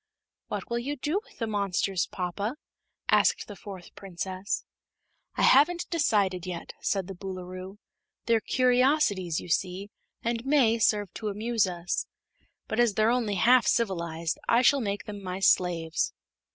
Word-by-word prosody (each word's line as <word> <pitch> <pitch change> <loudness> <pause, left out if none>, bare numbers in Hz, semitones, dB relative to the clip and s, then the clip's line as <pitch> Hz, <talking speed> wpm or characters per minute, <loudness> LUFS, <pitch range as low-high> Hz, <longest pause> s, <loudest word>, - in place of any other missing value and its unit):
"What - - -4
will 235 -1 -1
you 280 +5 -3
do 300 +9 -1
with - - -22
the 230 - -2
monsters, 195 -3 0
papa?" 200 +8 -3 0.5
asked - - +3
the 205 - -8
fourth 190 -2 -10
Princess. 190 +1 -4 0.7
"I - - 0
haven't 340 +6 +5
decided 200 - +1
yet," 175 -2 -6
said 195 -2 0
the 195 - -7
Boolooroo. 185 +1 -7 0.5
"They're 230 -1 +3
curiosities, 250 - +2
you - - -9
see, 185 +4 -1 0.3
and 235 0 -1
may 260 -5 +3
serve 205 -3 +2
to 215 - -5
amuse 215 +1 0
us. 175 -1 -3 0.6
But 220 - -2
as 235 -4 +3
they're 220 +1 +3
only 230 -5 0
half 240 +6 +5
civilized 170 -7 0
I 235 +2 +5
shall 275 +2 +5
make 200 -2 -2
them 205 -2 -7
my 185 0 -4
slaves." 175 -3 +2
205 Hz, 150 wpm, -28 LUFS, 185-235 Hz, 0.7 s, haven't